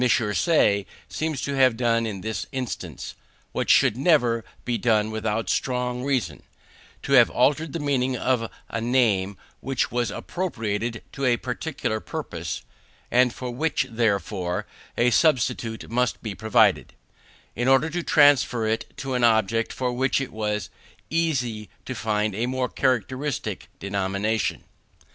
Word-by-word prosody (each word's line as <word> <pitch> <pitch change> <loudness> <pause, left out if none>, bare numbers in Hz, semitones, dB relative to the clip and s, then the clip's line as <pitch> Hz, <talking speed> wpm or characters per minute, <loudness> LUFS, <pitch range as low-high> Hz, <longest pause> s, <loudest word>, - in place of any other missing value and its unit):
Say 105 - +3 0.2
seems 155 -4 -3
to 140 - -2
have 130 -4 +4
done 115 -1 +1
in 100 -3 -5
this 110 +2 -4
instance, 130 -3 -5 0.4
what - - -2
should - - +5
never 125 -6 +3 0.2
be 120 -2 -1
done 110 -2 +2
without 110 0 -2
strong 125 -1 -1
reasons; 125 - -1 0.6
to 140 - -1
have 125 -3 +7
altered 145 +5 +2
the 165 - -3
meaning 130 -3 0
of 120 -2 0 0.2
a 115 - -3
name 110 -6 +2 0.2
which 135 -2 -1
was 120 -2 0
appropriated 115 - -3
to 140 - -3
a 120 -2 +3
particular 125 -3 -3
purpose 85 - -5 0.5
(and 125 0 +4
for 125 +1 -6
which, 150 +3 0
therefore, 100 -5 -1 0.3
a 120 +1 +3
substitute 120 -5 +1
must 125 +1 0
be 110 -3 -3
provided), 110 -2 +2 0.6
in 120 +3 -1
order 135 +4 +4
to 175 +2 -1
transfer 145 -7 +4
it 110 +1 -2
to 135 -1 -4
an 125 -1 0
object 115 0 +3
for 125 -1 -2
which 130 +2 +1
it 135 - -4
was 105 -3 -2 0.4
easy 125 - -1 0.2
to 130 - -4
find 105 -3 -1
a 115 +5 -1
more 130 0 -1
characteristic 130 +2 -1
denomination. 100 +2 -1
120 Hz, 140 wpm, -24 LUFS, 110-130 Hz, 0.6 s, have